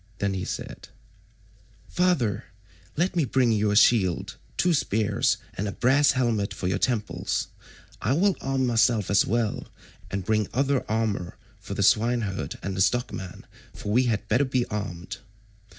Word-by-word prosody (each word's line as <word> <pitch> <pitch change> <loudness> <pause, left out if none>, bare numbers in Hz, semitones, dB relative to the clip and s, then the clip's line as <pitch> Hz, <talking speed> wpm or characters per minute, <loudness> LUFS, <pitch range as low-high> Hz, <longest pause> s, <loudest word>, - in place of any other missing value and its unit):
Then 100 0 -1
he 95 -1 -3
said: - - -6 1.0
"Father, 125 - +1 0.5
let 175 +4 +1
me 170 - +2
bring 130 -2 +2
you 105 -1 +2
a 105 - +1
shield, 105 -5 +3 0.2
two 180 -1 +3
spears, 110 -7 +1 0.2
and 105 - -3
a - - -2
brass 140 +6 +3
helmet 115 -6 0
for 90 - -3
your 95 +1 0
temples. 115 -3 -1 0.5
I - - +1
will 190 +6 +2
arm 135 -1 0
myself 115 -4 +2
as 100 - +4
well, 115 -1 -1 0.4
and 95 0 -3
will - - -19
bring 110 -1 +1
other 135 0 +1
armour 105 -5 -1 0.2
for 95 +1 -7
the 100 - 0
swineherd 105 - +1
and 95 -1 -3
the 95 - 0
stockman, 95 -4 -1 0.3
for 105 - -5
we 125 +4 +3
had 110 -2 -1
better 120 +7 +3
be 130 -2 0
armed." 100 -5 -5
110 Hz, 160 wpm, -26 LUFS, 100-130 Hz, 1.0 s, as